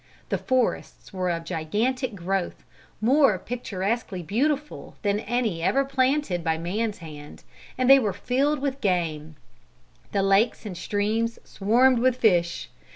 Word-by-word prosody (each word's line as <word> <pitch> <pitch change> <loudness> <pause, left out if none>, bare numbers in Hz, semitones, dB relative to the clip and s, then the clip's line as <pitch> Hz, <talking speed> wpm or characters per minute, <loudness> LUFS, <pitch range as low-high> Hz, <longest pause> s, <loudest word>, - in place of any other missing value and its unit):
The - - 0
forests 255 -4 -1
were 185 -1 -1
of 165 -1 -2
gigantic 215 - -1
growth, 190 0 -3 0.4
more 260 -2 +4
picturesquely 205 -3 -3
beautiful 285 - -2
than 205 0 +1
any 225 -6 -1
ever 275 +11 +2
planted 265 - 0
by 160 -1 0
man's 205 +6 -2
hand, 150 -2 -11 0.3
and 255 -1 +1
they 270 +1 +9
were 215 -6 0
filled 265 +9 0
with 275 -1 -3
game. 160 -5 -1 0.8
The 195 - +1
lakes 195 +4 +2
and 195 -4 -5
streams 215 +5 -1
swarmed 240 +5 +3
with 255 +1 +3
fish. 175 -8 +1
215 Hz, 135 wpm, -25 LUFS, 180-255 Hz, 0.8 s, they